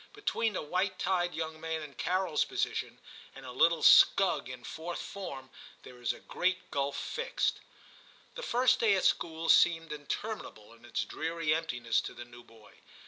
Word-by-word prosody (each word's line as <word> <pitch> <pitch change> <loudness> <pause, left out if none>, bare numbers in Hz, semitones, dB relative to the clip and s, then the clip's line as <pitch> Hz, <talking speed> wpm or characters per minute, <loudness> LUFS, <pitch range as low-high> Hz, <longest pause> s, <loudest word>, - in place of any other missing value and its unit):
Between 230 - -1
a - - -2
white 185 +4 -1
tied 175 -1 0
young 160 -1 -5
man 160 -1 -3
in 145 -2 -10
Carol's 180 -2 0
position, - - -3 0.4
and - - -11
a - - -7
little 160 +5 +3
scug 195 -10 +6
in 125 -1 -9
Fourth 165 +5 -6
Form 135 -10 -7 0.3
there 125 -1 -13
is 120 - +1
a - - -9
great 185 +1 -2
gulf 140 -1 -1
fixed. 480 +1 -2 0.7
That - - -7
first 250 - +2
day 215 -4 +4
at 190 - 0
school 165 0 0
seemed 165 -1 +4
intermin 150 +9 -4
able 105 +1 -16
in 115 +1 -18
its 120 - -2
dreary 165 -1 -1
emptiness 125 -8 0
to - - -8
the 120 - -8
new 120 0 -14
boy. 115 -2 -19
165 Hz, 175 wpm, -31 LUFS, 135-185 Hz, 0.7 s, scug